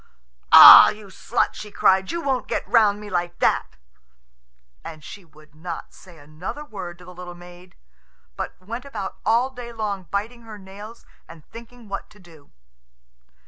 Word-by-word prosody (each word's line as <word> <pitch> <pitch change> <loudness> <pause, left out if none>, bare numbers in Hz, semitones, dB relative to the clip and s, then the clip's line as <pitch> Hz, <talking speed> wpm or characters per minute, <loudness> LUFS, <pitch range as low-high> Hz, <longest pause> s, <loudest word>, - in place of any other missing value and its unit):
"Ah, - - +11
you 210 -1 -10
slut," - - -2
she 210 - -10
cried, 190 -1 +1
"you 340 0 -5
won't 265 -2 -2
get - - -4
round 210 -3 +2
me 210 - -10
like 175 -2 -4
that!" - - -1 1.1
And 155 -1 -11
she 200 +5 -12
would 155 -2 -22
not 165 +2 -9
say 180 -3 -17
another 155 - -9
word 185 -8 -9
to 180 - -16
the 180 - -13
little 175 0 -10
maid, 175 +1 -16 0.6
but - - -7
went 230 +7 -8
about 235 -9 -7
all 235 +4 +1
day 245 -2 -10
long 205 -5 -5
biting 225 +4 -5
her 220 -2 -12
nails 205 +4 -13 0.2
and 165 -2 -15
thinking 235 0 -14
what 200 0 -7
to 210 - -21
do. 165 -6 -19
195 Hz, 165 wpm, -22 LUFS, 175-225 Hz, 1.1 s, Ah